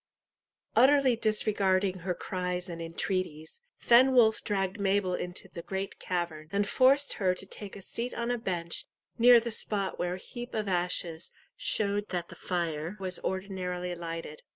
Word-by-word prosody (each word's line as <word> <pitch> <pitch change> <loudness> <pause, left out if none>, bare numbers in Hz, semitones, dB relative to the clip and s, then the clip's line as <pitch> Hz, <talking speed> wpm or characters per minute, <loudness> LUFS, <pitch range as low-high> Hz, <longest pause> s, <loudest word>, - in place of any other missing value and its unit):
Utterly 270 -2 +6
disregarding 200 -4 +1
her 180 +1 -2
cries 180 0 -3
and 170 -1 -6
entreaties, 165 - -3 0.2
Fenwolf 240 -2 +5
dragged 195 -1 -1
Mabel 195 -1 +1
into 180 0 -4
the 170 - -8
great 190 +3 -4
cavern, 170 -4 -3
and 200 0 +1
forced 275 +4 +4
her 185 -4 +1
to 190 - -8
take 200 +1 -8
a 200 - -9
seat 240 +5 -4
on 235 +1 -1
a 245 - -1
bench 170 -5 -3 0.3
near 240 0 +8
the 235 0 -4
spot 205 -3 -1
where 175 0 -1
a - - -7
heap 240 +5 -8
of 215 -2 -1
ashes 175 -2 -1 0.2
showed 205 0 0
that 175 -2 -3
the - - -10
fire 170 0 -3
was 185 -2 -2
ordinarily 185 -2 -3
lighted. 165 -3 -6
190 Hz, 155 wpm, -30 LUFS, 175-215 Hz, 0.3 s, near